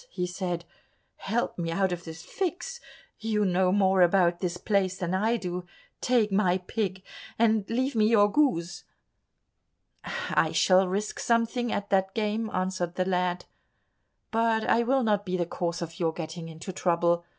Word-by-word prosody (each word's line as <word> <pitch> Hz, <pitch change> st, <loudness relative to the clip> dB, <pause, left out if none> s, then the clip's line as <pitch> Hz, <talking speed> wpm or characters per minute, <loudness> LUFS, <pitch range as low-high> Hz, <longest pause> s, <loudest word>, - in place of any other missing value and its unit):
he 180 Hz, -, -3 dB
said, 180 Hz, -1 st, -4 dB, 0.5 s
"help 225 Hz, -1 st, -2 dB
me 165 Hz, -1 st, -2 dB
out 190 Hz, +3 st, +1 dB
of 175 Hz, 0 st, -5 dB
this 160 Hz, 0 st, -9 dB
fix; 390 Hz, +6 st, -4 dB, 0.4 s
you 215 Hz, -1 st, 0 dB
know 185 Hz, 0 st, +2 dB
more 190 Hz, -1 st, +3 dB
about 175 Hz, -1 st, +4 dB
this 180 Hz, -1 st, -2 dB
place 190 Hz, -3 st, 0 dB
than 180 Hz, -1 st, -2 dB
I 220 Hz, +5 st, +1 dB
do, 180 Hz, -3 st, -4 dB, 0.4 s
take 235 Hz, -4 st, +2 dB
my 190 Hz, -2 st, +3 dB
pig 190 Hz, 0 st, -3 dB, 0.3 s
and 220 Hz, -3 st, +2 dB
leave 260 Hz, +4 st, 0 dB
me 215 Hz, -2 st, +3 dB
your 210 Hz, -2 st, +5 dB
goose." 175 Hz, -, +1 dB, 1.2 s
"I 485 Hz, 0 st, 0 dB
shall 185 Hz, 0 st, +4 dB
risk 200 Hz, +3 st, -3 dB
something 235 Hz, +1 st, +1 dB
at 205 Hz, 0 st, -3 dB
that 190 Hz, 0 st, +1 dB
game," 220 Hz, 0 st, -1 dB
answered 185 Hz, -2 st, -2 dB
the 185 Hz, -, 0 dB
lad, 180 Hz, -1 st, 0 dB, 0.9 s
"but 225 Hz, -1 st, +2 dB
I 235 Hz, -, +4 dB
will 260 Hz, +2 st, +2 dB
not 210 Hz, -2 st, +1 dB
be 185 Hz, -2 st, -2 dB
the 175 Hz, -, 0 dB
cause 170 Hz, 0 st, -3 dB
of 165 Hz, 0 st, -8 dB
your 165 Hz, -2 st, +1 dB
getting 165 Hz, 0 st, -6 dB
into 165 Hz, +4 st, -8 dB
trouble." 170 Hz, -1 st, +1 dB
190 Hz, 160 wpm, -27 LUFS, 175-220 Hz, 1.2 s, your